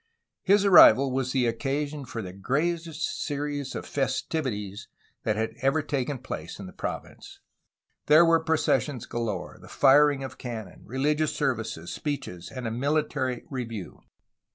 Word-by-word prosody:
His 200 +1 +4
arrival 140 - +8
was 130 -1 -1
the 130 -2 +2
occasion 140 +4 -2
for 120 -3 -5
the 90 -1 -7
greatest 160 - -2
series 145 -2 -3
of - - -5
festivi 130 -5 -2
ties 105 +2 -10 0.3
that 110 - 0
had 110 +1 -2
ever 135 +3 +2
taken 140 -1 -2
place 85 -11 -7
in 100 - -8
the 90 - -10
province. - - -7 0.7
There 155 +3 +7
were 165 -1 +4
processions 150 -5 +1
galore, 110 -6 -4
the - - -13
firing 145 0 +5
of 130 -1 -8
cannon, 110 -7 -7
religious 150 +5 0
services, 110 -9 -2
speeches, 90 - -5
and 130 -2 -7
a 115 - -2
military 130 -1 -1
review. 115 -7 -6
135 Hz, 145 wpm, -27 LUFS, 115-150 Hz, 0.7 s, arrival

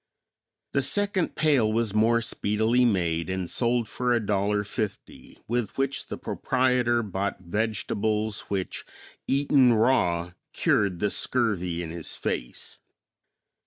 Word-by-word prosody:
The - - +1
second 205 -3 +1
pail 140 -8 +3
was 110 -2 0
more 115 +2 +3
speedily 110 +4 +1
made 85 -7 0
and 95 -1 -2
sold 120 +5 0
for 120 +2 0
$1.50 105 0 -3
with 120 -2 -2
which 135 0 -1
the - - -5
proprietor 125 -2 +1
bought 100 -1 -3
vegetables 105 +2 -1
which 95 -2 -3 0.4
eaten 135 -3 +4
raw 90 -8 +2 0.2
cured 95 -4 +1
the 105 - +1
scurvy 90 -9 0
in 80 - -6
his 85 -1 -6
face. - - -5
110 Hz, 115 wpm, -26 LUFS, 95-120 Hz, 0.4 s, eaten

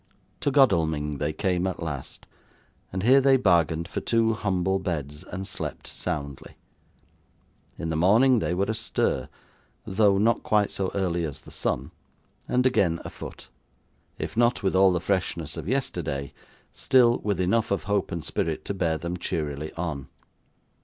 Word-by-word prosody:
To - - +1
Godalming 80 - +2
they 75 +1 0
came 90 +2 0
at 90 -2 -4
last, 70 -5 -6 0.7
and 95 +1 -3
here 130 +4 +6
they 135 0 +5
bargained 85 - +2
for - - -4
two 115 -1 +2
humble 95 -2 0
beds, 75 -5 -4
and 95 +2 -6
slept - - -6
soundly. 70 -2 -5 1.2
In 80 - -3
the - - -1
morning 110 +10 +5
they 90 - -1
were 95 +2 +1
astir: 110 - -1 0.6
though 100 0 +3
not 115 +4 +2
quite 105 -2 +2
so 95 -1 -2
early 90 -3 0
as 75 -4 -5
the - - -14
sun: 65 +2 -2 0.6
and 125 +1 +1
again 90 -10 +2
afoot; - - -9 0.7
if - - -5
not 120 -1 +2
with 95 - +1
all 95 0 +6
the 90 - +1
freshness 85 -4 -2
of 80 -1 -6
yesterday, 80 - -2 0.4
still, 125 -3 +4
with 100 -3 -1
enough 110 +5 +1
of 100 - 0
hope 100 +1 0
and 85 -2 -4
spirit 80 -2 -2
to - - -2
bear 85 -4 0
them 85 +3 -4
cheerily 75 -3 -3
on. 80 -5 -4
90 Hz, 155 wpm, -26 LUFS, 80-105 Hz, 1.2 s, here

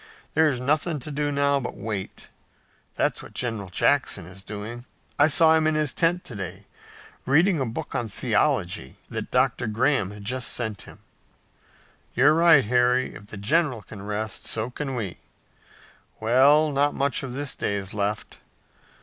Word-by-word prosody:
"There's 155 -6 +3
nothing 150 +5 0
to 150 - -5
do 145 0 -1
now 140 0 +2
but 125 - -6
wait. 100 -2 -5 0.7
That's - - 0
what - - -13
General 115 -6 -2
Jackson 105 -2 +1
is 95 +2 -10
doing. 105 +5 -7 0.3
I 145 - +7
saw 160 +1 +6
him 160 -1 +2
in 155 - +1
his 150 -3 0
tent 175 +1 +1
to - - -8
day, 95 0 -6 0.6
reading 160 +6 +3
a 130 - -1
book 115 - -6
on 120 -2 -2
theology 65 -8 0 0.2
that - - -4
Dr. 120 - +1
Graham 115 -1 +1
has 105 0 -10
just 125 +3 -2
sent 110 -4 -3
him." - - -15 1.1
"You're 140 +5 +5
right, 165 -5 +6
Harry. 125 +2 +2
If 100 - -12
the 105 - -9
general 125 +2 +1
can 105 -3 -11
rest, 105 +1 -4
so 115 +2 -1
can 135 0 -4
we. 105 -7 -4 1.0
Well, 140 +7 +4
not 145 +1 +1
much 140 -2 0
of 130 -3 -6
this 140 0 -2
day 100 - -2
is 95 -1 -5
left. 105 0 -3
125 Hz, 165 wpm, -25 LUFS, 105-145 Hz, 1.1 s, I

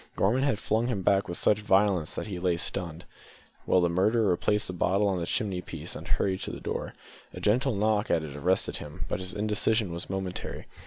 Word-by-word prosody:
Gorman 115 +7 +2
had 135 -6 +2
flung 110 +2 0
him 105 -7 -2
back 100 +1 +3
with 85 - -3
such 105 - +4
violence 95 -5 +2
that - - -3
he 100 -4 -5
lay 90 -1 +1
stunned, 85 -1 -4 0.6
while 95 - +4
the 85 - +3
murderer 100 +4 +2
replaced 105 +4 +1
the 90 - -3
bottle 95 +3 +2
on 95 -2 0
the 85 - -3
chimney 95 -4 -1
piece - - -6
and - - -8
hurried 95 -1 0
to - - -4
the - - -7
door. - - -4 0.4
A - - -6
gentle 125 +4 +2
knock 105 +1 +1
at 80 - +2
it 75 -2 -7
arrested 90 +6 +1
him, 75 0 -7
but - - -2
his 95 +1 -5
indecision 105 -1 +1
was 85 +1 -5
momentary. 95 -1 -4
95 Hz, 215 wpm, -28 LUFS, 90-105 Hz, 0.6 s, such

